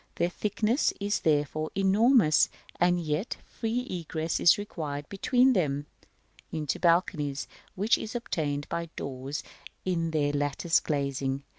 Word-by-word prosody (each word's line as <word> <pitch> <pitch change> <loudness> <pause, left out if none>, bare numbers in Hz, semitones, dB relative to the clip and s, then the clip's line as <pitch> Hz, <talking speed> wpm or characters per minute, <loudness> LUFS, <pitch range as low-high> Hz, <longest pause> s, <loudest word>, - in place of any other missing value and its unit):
Their 170 - +1
thickness 215 - +1
is 205 +1 0
therefore 155 0 +1
enormous; 195 - +4 0.3
and 175 0 +3
yet 160 +5 -2
free 230 +2 -2
egress 165 -2 -2
is 175 - +6
required 150 -8 -5
between 250 +6 +3
them 145 - 0 0.7
(into 150 -3 -2
balconies) 165 -5 +1 0.3
which 210 +5 +2
is 220 - -6
obtained 145 -11 -2
by 170 0 -3
doors 135 +1 -5 0.4
in 170 -3 0
their 145 -2 0
lattice 145 +4 +1
glazing. 140 -2 -2
165 Hz, 125 wpm, -28 LUFS, 145-200 Hz, 0.7 s, is